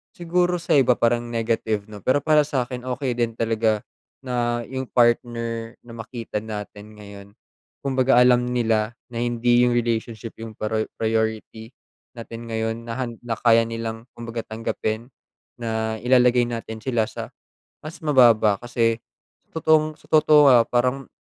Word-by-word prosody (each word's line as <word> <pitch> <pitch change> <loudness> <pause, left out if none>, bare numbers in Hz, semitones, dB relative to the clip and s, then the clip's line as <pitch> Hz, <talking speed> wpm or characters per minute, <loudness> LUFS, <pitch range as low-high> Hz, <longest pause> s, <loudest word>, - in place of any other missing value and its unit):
Siguro 175 +1 +1
sa 175 - -5
iba 125 -2 +4
parang 120 0 +1
negative 110 -2 -2
na, 105 - -9
pero 130 +7 +1
para 150 -2 +4
sa'kin 125 -3 -3
okey 130 +1 -2
din 115 -1 0
talaga, 110 -2 0 0.4
na 120 -2 -1
yung 130 +2 -5
partner 115 -1 0
na 120 - -13
makita 115 -1 -5
natin 105 0 -8
ngayon. 100 -1 -11 0.6
Kumbaga 130 -1 +2
alam 125 0 +5
nila 115 -2 0 0.2
na 115 - -4
hindi 120 +1 +2
yung 120 - +1
relationship 115 -1 -2
yung 110 -1 -8
prio 110 0 -2
priority 110 0 -2 0.5
natin 115 0 -9
ngayon 115 +1 -3
na 115 - -4
han 120 -3 -4
na 120 -1 -3
kaya 115 -1 +4
nilang 115 0 -5
kumbaga 115 0 -6
tanggapin 110 +2 -4 0.5
na 110 -1 -2
ilalagay 125 -1 +4
natin 115 -2 -6
sila 120 -3 0
sa - - -6 0.6
mas 155 +2 -8
mababa 120 -7 +5
kasi 115 -1 0 0.5
sa - - -9
totoong 155 -1 +2
totoo 155 -1 +5
ah, 125 -3 +7
parang 125 +2 0
115 Hz, 145 wpm, -23 LUFS, 110-125 Hz, 0.6 s, ah